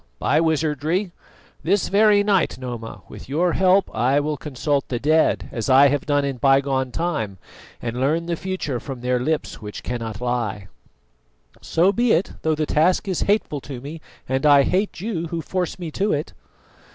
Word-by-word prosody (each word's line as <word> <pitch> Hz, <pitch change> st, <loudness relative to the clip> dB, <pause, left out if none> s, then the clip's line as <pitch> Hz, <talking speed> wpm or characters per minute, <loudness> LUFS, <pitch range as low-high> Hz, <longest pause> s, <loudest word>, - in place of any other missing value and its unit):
By 150 Hz, -, +2 dB
wizardry. 160 Hz, +3 st, 0 dB, 0.5 s
This 195 Hz, +4 st, +1 dB
very 205 Hz, 0 st, +5 dB
night, 200 Hz, -4 st, +1 dB
Noma, 120 Hz, -3 st, -7 dB
with -, -, -11 dB
your 170 Hz, +5 st, +1 dB
help 190 Hz, +1 st, +3 dB
I 130 Hz, +4 st, +2 dB
will 150 Hz, +1 st, -1 dB
consult 145 Hz, 0 st, -2 dB
the 125 Hz, -, -2 dB
dead, 155 Hz, +5 st, +2 dB
as 115 Hz, +1 st, -3 dB
I 135 Hz, +2 st, +7 dB
have 145 Hz, 0 st, -1 dB
done 145 Hz, -1 st, +2 dB
in 135 Hz, -2 st, -3 dB
bygone 135 Hz, -1 st, +2 dB
time, 115 Hz, -, -2 dB, 0.5 s
and 120 Hz, +1 st, -3 dB
learn 160 Hz, +5 st, +1 dB
the 170 Hz, 0 st, -1 dB
future 175 Hz, -8 st, -3 dB
from 130 Hz, -2 st, -7 dB
their 125 Hz, 0 st, 0 dB
lips 155 Hz, +1 st, -2 dB
which 105 Hz, -1 st, -8 dB
cannot 115 Hz, -4 st, -4 dB
lie." 115 Hz, -6 st, -2 dB, 0.9 s
"So 175 Hz, +4 st, +2 dB
be 240 Hz, +2 st, +2 dB
it; 170 Hz, -, +1 dB
though 160 Hz, -1 st, +1 dB
the 155 Hz, 0 st, -1 dB
task 170 Hz, +7 st, +2 dB
is 185 Hz, -3 st, -1 dB
hateful 200 Hz, -9 st, +1 dB
to 135 Hz, -2 st, -7 dB
me, 150 Hz, +5 st, -8 dB, 0.3 s
and 130 Hz, +2 st, -1 dB
I 145 Hz, -2 st, +6 dB
hate 190 Hz, +3 st, -1 dB
you 185 Hz, -6 st, -3 dB
who 165 Hz, +1 st, -4 dB
force 180 Hz, +2 st, -3 dB
me 170 Hz, -3 st, -6 dB
to 200 Hz, +6 st, 0 dB
it." 150 Hz, +1 st, -3 dB
150 Hz, 175 wpm, -22 LUFS, 130-175 Hz, 0.9 s, I